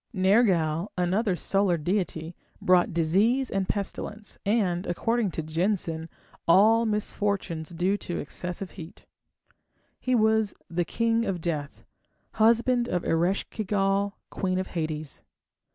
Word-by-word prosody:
Nergal, 185 Hz, -4 st, +3 dB
another 185 Hz, +3 st, +1 dB
solar 195 Hz, -1 st, +1 dB
deity, 170 Hz, -1 st, -2 dB, 0.2 s
brought 180 Hz, -1 st, +3 dB
disease 200 Hz, +11 st, +2 dB
and 195 Hz, -1 st, -1 dB
pestilence, 210 Hz, +1 st, -4 dB
and, 195 Hz, -4 st, +1 dB
according 225 Hz, +4 st, 0 dB
to 160 Hz, -, -4 dB
Jensen, 165 Hz, 0 st, -1 dB, 0.4 s
all 220 Hz, +6 st, +5 dB
misfortunes 200 Hz, -6 st, -1 dB
due 180 Hz, +4 st, 0 dB
to 175 Hz, -, -5 dB
excessive 180 Hz, +5 st, -4 dB
heat. 170 Hz, -2 st, -11 dB, 0.9 s
He 255 Hz, 0 st, +1 dB
was 220 Hz, -2 st, +2 dB, 0.2 s
the 175 Hz, +1 st, 0 dB
king 230 Hz, +3 st, +1 dB
of 185 Hz, -2 st, -1 dB
death, 155 Hz, -4 st, -4 dB, 0.6 s
husband 235 Hz, +2 st, +4 dB
of 180 Hz, -1 st, -1 dB
Eresh 175 Hz, +4 st, +1 dB
ki 220 Hz, -, -3 dB
gal, 200 Hz, 0 st, 0 dB
queen 185 Hz, -1 st, -1 dB
of 185 Hz, -, -1 dB
Hades. 155 Hz, -3 st, -4 dB
190 Hz, 120 wpm, -27 LUFS, 170-210 Hz, 0.9 s, all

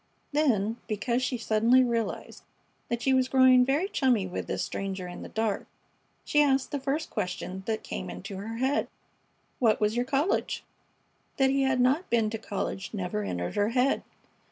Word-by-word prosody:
Then, 230 Hz, -8 st, +1 dB
because 235 Hz, +3 st, -1 dB
she 255 Hz, 0 st, -1 dB
suddenly 230 Hz, +3 st, +4 dB
realized 235 Hz, -2 st, -2 dB, 0.5 s
that 235 Hz, 0 st, -2 dB
she 265 Hz, -, +3 dB
was 260 Hz, 0 st, +2 dB
growing 260 Hz, -1 st, +6 dB
very 285 Hz, +9 st, +1 dB
chummy 255 Hz, -, +2 dB
with 185 Hz, -, -5 dB
this -, -, -2 dB
stranger 190 Hz, -2 st, -4 dB
in 175 Hz, -, -8 dB
the -, -, -8 dB
dark, 220 Hz, -2 st, -1 dB, 0.6 s
she 295 Hz, -, +3 dB
asked 270 Hz, -2 st, +2 dB
the 285 Hz, -, -1 dB
first 280 Hz, +4 st, -2 dB
question 185 Hz, +1 st, -3 dB
that 220 Hz, -1 st, -1 dB
came 90 Hz, -, -5 dB
into 90 Hz, -, -7 dB
her 220 Hz, +4 st, -5 dB
head. 265 Hz, +4 st, +1 dB, 0.7 s
"What 225 Hz, -4 st, +3 dB
was 210 Hz, +1 st, +1 dB
your 245 Hz, +1 st, +1 dB
college?" 280 Hz, +7 st, 0 dB, 0.7 s
That 265 Hz, -1 st, +4 dB
he 275 Hz, 0 st, +2 dB
had 265 Hz, -1 st, +2 dB
not 270 Hz, +9 st, +2 dB
been 225 Hz, -2 st, +2 dB
to 225 Hz, -, -4 dB
college 200 Hz, -1 st, -4 dB
never 205 Hz, +2 st, -2 dB
entered 90 Hz, -, -3 dB
her 205 Hz, +1 st, +1 dB
head. 255 Hz, +3 st, +2 dB
235 Hz, 175 wpm, -28 LUFS, 210-265 Hz, 0.7 s, growing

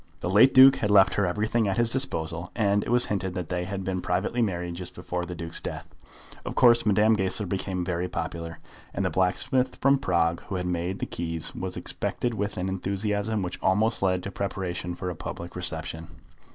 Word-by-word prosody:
The 90 Hz, -, -2 dB
late 110 Hz, +7 st, +7 dB
Duke 130 Hz, +1 st, +8 dB
had 105 Hz, -, -1 dB
left 100 Hz, -2 st, +6 dB
her 100 Hz, -2 st, +1 dB
everything 110 Hz, +4 st, 0 dB
at 95 Hz, -, -1 dB
his 120 Hz, -1 st, +2 dB
disposal, 85 Hz, -, -2 dB
and, 105 Hz, -2 st, +2 dB
it -, -, -5 dB
was 120 Hz, 0 st, +3 dB
hinted 95 Hz, -2 st, -2 dB
that 90 Hz, -4 st, -4 dB
they 90 Hz, 0 st, -2 dB
had 95 Hz, +1 st, -4 dB
been 95 Hz, -1 st, -2 dB
privately 95 Hz, +8 st, -1 dB
married 90 Hz, -5 st, -1 dB
just 90 Hz, +1 st, -8 dB
before 90 Hz, 0 st, -4 dB
the 90 Hz, 0 st, -6 dB
Duke's 85 Hz, 0 st, -1 dB
death. -, -, -5 dB, 0.6 s
Of -, -, -5 dB
course 120 Hz, -3 st, +5 dB
Madame 105 Hz, +2 st, +4 dB
Goesler 95 Hz, +1 st, -1 dB
became 95 Hz, -1 st, -2 dB
very 90 Hz, 0 st, -1 dB
popular, 85 Hz, -2 st, -5 dB, 0.4 s
and 95 Hz, -, 0 dB
the 90 Hz, -, 0 dB
blacksmith 95 Hz, +9 st, +1 dB
from 140 Hz, 0 st, +3 dB
Prague 85 Hz, -7 st, +1 dB
who 100 Hz, -, -4 dB
had 90 Hz, -1 st, -2 dB
made 90 Hz, +1 st, -2 dB
the -, -, -3 dB
key 80 Hz, -1 st, -4 dB
was -, -, -5 dB
expected 120 Hz, -1 st, -2 dB
with 105 Hz, -1 st, -3 dB
an 90 Hz, +1 st, -2 dB
enthusiasm 100 Hz, +2 st, -1 dB
which 90 Hz, -1 st, -5 dB
almost 105 Hz, +4 st, +2 dB
led 90 Hz, -2 st, +1 dB
to 100 Hz, -, -5 dB
preparation 90 Hz, -3 st, -3 dB
for 90 Hz, 0 st, -4 dB
a -, -, -7 dB
public 85 Hz, +2 st, -7 dB
reception. 85 Hz, -2 st, -4 dB
95 Hz, 205 wpm, -26 LUFS, 90-105 Hz, 0.6 s, Duke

